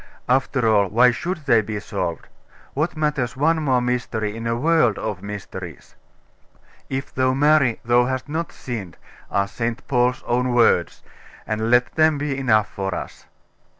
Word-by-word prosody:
After 130 -1 +1
all, 105 -2 +4
why 120 +6 +4
should 155 +5 -4
they 115 -5 +4
be 105 0 -5
solved? 85 -5 -4 0.5
What 155 +4 -2
matters 150 -5 -1
one 160 +3 +2
more 130 -4 +2
mystery 120 -4 -2
in 115 0 -5
a 115 - 0
world 140 -4 +2
of 105 -4 -4
mysteries? 95 -4 -8 1.0
"If 135 +1 -4
thou 130 0 +1
marry, 145 -4 +3
thou 120 +1 +4
hast 130 +1 -3
not 160 +3 -3
sinned," 105 -10 -7 0.3
are 100 0 0
St. 115 +5 -4
Paul's 125 -1 +1
own 125 +1 0
words; 120 - +2 0.4
and 110 +1 -2
let 125 +1 +3
them 155 -1 +3
be 145 -1 -2
enough 110 -6 +2
for 95 -1 -4
us. - - -8
125 Hz, 155 wpm, -22 LUFS, 110-135 Hz, 1.0 s, all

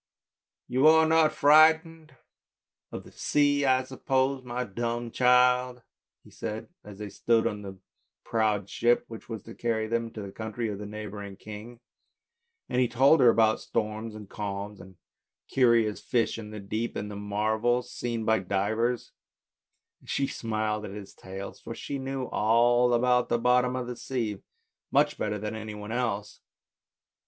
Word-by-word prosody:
" - - -66
You 130 +4 +3
are 160 0 +7
not 160 -1 +4
frightened 160 0 +4 0.8
of - - -6
the - - -15
sea, 145 -1 +2
I 130 -1 +3
suppose, 130 +1 0
my| 125 0 -3
dumb 120 +2 -3
child? 125 0 +3 0.2
" - - -64
he - - -18
said, 110 -1 -6
as 105 -2 -11
they 105 0 -6
stood 115 +3 +1
on 105 -1 -2
the 95 -1 -8 0.5
proud 105 -3 0
ship 120 +3 +2
which 115 0 -10
was 110 -4 -6
to 115 - -10
carry 115 -2 -1
them 115 +1 -1
to 105 - -6
the 100 - -7
country 110 +2 -4
of 100 -1 -5
the 105 - -6
neighbouring 105 -1 -7
king; 110 +4 -10 0.9
and 125 0 +1
he 125 - +3
told 135 +7 +4
her 125 -3 +7
about 110 -1 +3
storms 110 0 -3
and 105 -2 -9
calms, 100 0 -5
about 95 +1 -14 0.5
curious 115 -5 +3
fish 115 -2 0
in 105 -1 -8
the 105 0 -7
deep, 110 +4 -3
and 105 0 -4
the - - -7
marvels 110 +4 0
seen 115 -2 -3
by 110 0 +3
divers; 110 +6 -1 0.9
and - - -19
she 140 - +1
smiled 110 -3 -2
at 100 -1 -7
his 100 -2 -9
tales, 95 +1 -8
for - - -8
she 140 - -5
knew 135 0 -3
all 120 +2 +3
about 125 +1 +2
the - - +2
bottom 125 +1 +2
of 125 -1 -3
the 125 0 -5
sea 115 -6 -3 0.5
much - - +2
better 105 0 -1
than 105 +1 -4
any 110 -1 -6
one 105 +1 -7
else. 115 -4 -2
115 Hz, 170 wpm, -28 LUFS, 105-125 Hz, 0.9 s, are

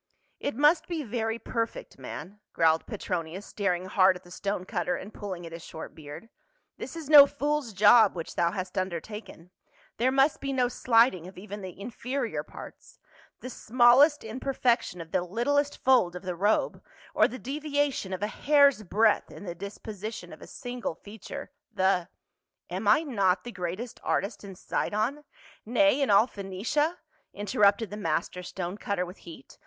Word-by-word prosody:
" - - -44
It - - -8
must 300 +5 +4
be 330 -3 -3
very 225 -1 -2
perfect, 230 - -4
man," 205 +3 -8
growled 160 -1 +2
Pctronius, 180 -2 -4
staring 185 -3 -1
hard 185 -1 +4
at 180 - -11
the 175 - -16
stone 195 0 -3
cutter 180 -4 -1
and 205 +3 -8
pulling 185 -4 -6
at 165 - -9
his 165 +1 -8
short 160 - -9
beard. 150 +9 -10 0.2
" - - -46
This - - -7
is 325 -3 -7
no 290 -2 +10
fool's 290 -3 -2
job 205 +1 +6
which 165 -2 -6
thou 170 - +2
hast 185 0 -3
undertaken; 185 0 -6 0.5
there 255 +3 +2
must 270 +3 +3
be 275 0 -2
no 250 -2 +2
slighting 230 -8 +3
of 190 - -13
even 205 +2 -8
the 185 -1 -9
inferior 245 +5 -3
parts; - - -12 0.4
the 255 - -6
smallest 255 +6 +5
imperfection 240 -5 -1
of 165 0 -11
the - - +1
littlest 280 +10 0
fold 240 -10 +3
of 180 - -7
the 180 -1 -3
robe, 205 - +1 0.3
or - - +5
the 255 - -7
deviation 285 -5 -2
of 185 +2 -3
a - - +1
hair's 280 +1 +4
breadth 215 +2 +2
in - - -11
the 175 - -4
disposition 205 +3 -7
of - - -13
a - - -10
single 245 -8 -5
feature; 220 - -9 0.2
the 190 -4 +1 0.2
— - - -56
" - - -58
"Am 190 +4 -3
I 220 +10 +5
not 200 - +1
the 240 - -7
greatest 185 +4 -5
artist 200 +3 -1
in 195 -2 -9
Sidon 225 +10 -2 0.2
— - - -24
na>', 245 +6 +1 0.2
in 275 - +1
all 205 +2 +6
Phoenicia?" 230 - -2 0.4
in'.errupted 205 +1 +2
the 210 - -5
master 170 -1 -2
stone 180 +2 -5
cutter 200 -3 -1
with 180 +2 -11
heat. 165 -5 -13
210 Hz, 180 wpm, -28 LUFS, 185-255 Hz, 0.5 s, no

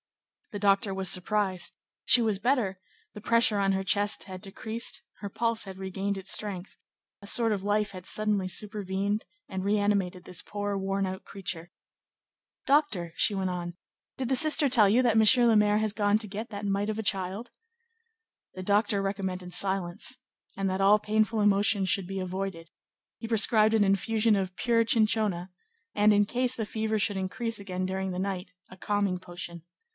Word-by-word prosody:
The 205 - -6
doctor 200 0 +2
was 190 -1 +1
surprised; 190 0 0 0.3
she 245 - +6
was 215 -3 0
better; 230 -6 0 0.3
the 210 - -10
pressure 230 -1 +3
on 195 0 +2
her 195 0 -1
chest 205 +2 +1
had 185 -1 -9
decreased; 220 +4 -2 0.2
her 200 - -6
pulse 230 +2 0
had 190 -2 -9
regained 195 +1 -3
its 195 0 -1
strength; 200 -3 -2 0.5
a 200 - -11
sort 225 0 +2
of 195 -2 -4
life 205 0 0
had 185 -2 -10
suddenly 210 -3 +1
supervened 205 0 -2 0.2
and 190 0 -5
reanimated 200 -3 0
this 180 -1 -3
poor, 205 0 -4
worn 195 0 -1
out 190 0 -6
creature. 175 -3 -6 0.9
"Doctor," 265 - +1
she 210 - +2
went 190 -1 -1
on, 175 -1 -5 0.4
"did 260 - -3
the 265 - +1
sister 305 +1 +4
tell 230 -6 +5
you 235 +5 +4
that 235 -3 +2
M. 225 +3 +6
le 225 - +4
Maire 210 0 +3
has 215 -1 0
gone 205 -1 +2
to 215 -1 -4
get 215 +4 -6
that 205 -1 -6
mite 200 +1 -1
of 215 0 -3
a - - -3
child?" 195 +3 -2 1.0
The 185 - -6
doctor 205 +1 +2
recommended 190 -2 -4
silence, 190 +4 0 0.4
and 195 -1 -1
that 190 +1 -2
all 205 +2 +5
painful 215 +1 0
emotions 200 -1 +2
should 190 0 +1
be 195 0 -4
avoided; 185 -2 -5 0.5
he 225 - -6
prescribed 220 -1 +4
an 215 - +4
infusion 215 +3 +2
of 190 -2 -3
pure 230 -1 +2
chinchona, 215 -5 0 0.4
and, 210 +1 +4
in 205 0 +4
case 250 +3 +1
the 220 - -3
fever 220 +1 -2
should 205 -1 +1
increase 225 +4 -3
again 185 -2 -4
during 190 0 -3
the 180 - -4
night, 190 -1 -4 0.2
a - - -12
calming 200 -1 -1
potion. 175 -2 -8
200 Hz, 180 wpm, -28 LUFS, 190-215 Hz, 1.0 s, she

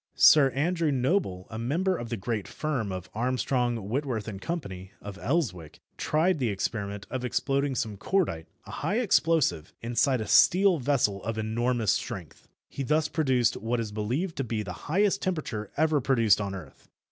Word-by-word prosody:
Sir 145 -3 +7
Andrew 165 +3 +1
Noble, 130 - 0
a 110 - -5
member 170 +11 0
of 120 -7 -6
the 115 - -2
great 105 +1 -3
firm 130 -10 -2
of 95 -1 -5
Armstrong, 120 -2 0
Whitworth 125 -2 -2
& - - -25
Co., 170 +1 -2 0.4
of 100 -1 -9
Elswick, 115 - -2 0.2
tried 160 +2 +1
the 125 -4 +1
experiment 100 0 -3
of 130 -1 -3
exploding 135 +2 0
some 110 -3 -2
cordite, 100 - 0 0.2
a - - -10
high 205 - -1
explosive, 160 - +2
inside 120 +3 +1
a 110 - -3
steel 185 - +5
vessel 120 -7 +1
of 115 0 -3
enormous 115 +1 0
strength. - - -5 0.2
He - - -6
thus 150 +3 +1
produced 130 -7 +1
what 115 +2 -1
is 110 -2 -3
believed 125 - -2
to 135 - 0
be 110 -3 -2
the 90 -3 -6 0.2
highest 195 +4 +2
temperature 145 - -3
ever 155 -1 +2
produced 115 -6 +3
on 100 -1 -3
earth. 80 -8 -12
125 Hz, 170 wpm, -27 LUFS, 105-155 Hz, 0.4 s, Sir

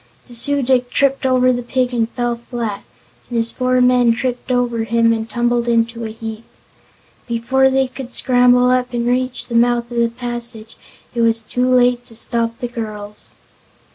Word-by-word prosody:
The 245 - -13
Su 285 +4 +3
dic 250 -1 +1
tripped 275 0 +1
over 255 0 +3
the 245 - -3
pig 250 +1 -1
and 230 -2 0
fell 240 -1 -2
flat, 235 -3 -5 0.5
and 240 - -3
his 230 0 +5
four 255 0 0
men 250 -1 +4
tripped 250 +1 -4
over 245 -2 0
him 230 +1 +2
and 225 0 -4
tumbled 240 +1 0
in 230 -1 +2
a 230 -1 -5
heap. 220 0 -8 0.8
Before 255 +3 +1
they 265 0 +1
could 255 -1 -9
scramble 250 0 +3
up 250 0 0
and 235 0 -1
reach 255 +1 -1
the 235 - -8
mouth 240 0 +1
of 240 - -5
the 235 0 +2
passage 235 -2 -3 0.4
it 235 - -1
was 230 -1 +2
too 250 +3 -1
late 245 -1 +3
to 225 - -8
stop 230 0 -1
the 245 - -4
two 240 - -20
girls. 210 -1 -9
240 Hz, 185 wpm, -18 LUFS, 230-250 Hz, 0.8 s, his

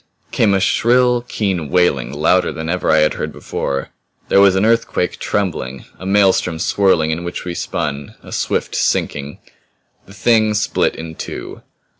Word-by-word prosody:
Came 100 -3 +3
a - - +2
shrill, 125 +4 +3
keen 95 -10 -2
wailing 90 -8 +1
louder - - +2
than 80 0 -5
ever 90 +1 -1
I 80 0 +5
had 75 - +2
heard - - -4
before. 70 0 -4 0.4
There 100 - +5
was 100 -1 +5
an 95 +2 +2
earthquake 115 -5 0
trembling; 85 -10 -3
a 95 - -7
maelstrom 95 -4 +2
swirling 80 -2 +2
in 80 +2 -3
which 85 0 -5
we 90 - -3
spun; 70 -4 -4
a - - -12
swift - - -2
sinking. 70 0 -1 0.7
The 100 - -14
Thing 110 +1 +2
split 105 +2 0
in 80 0 -7
two. - - -7
90 Hz, 160 wpm, -18 LUFS, 80-105 Hz, 0.7 s, I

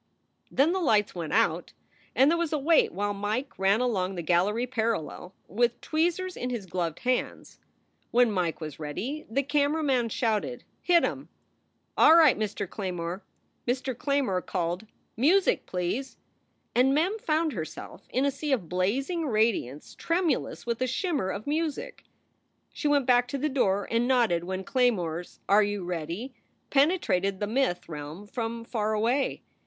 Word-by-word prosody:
Then 285 +5 +3
the 380 - 0
lights 215 - +2
went 170 -3 -5
out - - +1 0.4
and 270 +4 +5
there 340 - +2
was 340 -3 -1
a 310 - +1
wait 310 +3 +3
while 205 +2 -2
Mike 210 +7 -3
ran 195 +4 +3
along 195 -6 0
the 175 - -4
gallery 190 +8 +2
parallel, 220 -7 -3
with 240 +3 +1
tweezers 350 +3 -1
in 250 - -3
his 235 -5 -4
gloved 170 -3 -3
hands. 250 0 -2 0.5
When 245 -2 +4
Mike 180 -5 -1
was 155 -3 -7
ready 225 - -5
the 275 +5 0
camera 290 +2 +1
man 255 -5 +1
shouted: 210 - -1 0.2
"Hit 345 -1 +4
em! - - -3 0.7
All 320 - +7
right, 320 -5 +7
Mr. 210 -2 -3
Claymore!" 180 -1 -4 0.4
Mr. 255 +1 -1
Claymore 260 -8 0
called, 180 +3 -3 0.3
"Music, 345 - +3
please!" 185 +9 -3 0.6
And 260 +3 +4
Mem 370 +9 +1
found 315 -4 0
herself 160 -5 -7
in 260 +2 +1
a 280 - +2
sea 290 +2 -4
of 205 -10 -1
blazing 270 - -1
radiance 215 - 0
trem 340 +1 0
ulous - - -2
with 235 0 -2
a 255 - +2
shimmer 285 - -1
of 200 +2 -5
music. 320 - -3 0.7
She 300 - -2
went 285 -2 +3
back 245 -1 +4
to 275 - -3
the 300 +3 -1
door 200 -7 +1
and 230 +1 +2
nodded 225 -10 +2
when 190 +1 -4
Claymore 190 -10 +1
s 175 - -13
"Are 205 +2 +6
you 205 -2 -1
ready?" 175 - -4 0.4
penetrated 270 - +2
the 205 - 0
myth 220 -5 0
realm 155 +5 -7
from 230 +1 -4
far 220 -2 -1
away. 240 +6 0
230 Hz, 160 wpm, -27 LUFS, 190-280 Hz, 0.7 s, All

